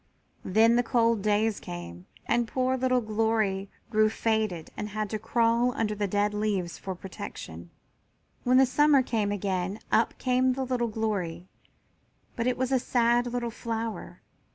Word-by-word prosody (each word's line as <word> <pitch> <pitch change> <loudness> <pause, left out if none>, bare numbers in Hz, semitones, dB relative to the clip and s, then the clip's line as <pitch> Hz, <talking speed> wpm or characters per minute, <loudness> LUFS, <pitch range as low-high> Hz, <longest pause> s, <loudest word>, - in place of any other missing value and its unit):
Then 225 +5 +4
the - - +5
cold 230 -2 +2
days 210 +1 +1
came 85 0 -8 0.2
and 240 -1 +1
the - - -18
poor 260 0 +1
little 255 -1 +1
Glory 215 -3 0 0.2
grew 215 -1 +4
faded 215 -7 -1
and 210 - -4
had 215 0 -3
to 215 - -2
crawl 235 +3 +2
under 215 -2 0
the 205 -1 -1
dead 205 +2 0
leaves 205 -5 -1
for 190 -1 -5
protection. 85 - -8 0.7
When 250 +1 +4
the 265 - +7
summer 285 +1 +4
came 215 -4 -1
again 190 -1 -2
up 225 - +2
came 255 0 +2
the 265 +1 -2
little 245 -2 0
Glory, 200 -6 -3 0.9
but 230 +1 -1
it 250 - +1
was 260 0 -1
a 260 - +3
sad 240 0 +2
little 240 -1 -2
flower. 225 -1 -5
220 Hz, 160 wpm, -27 LUFS, 205-245 Hz, 0.9 s, the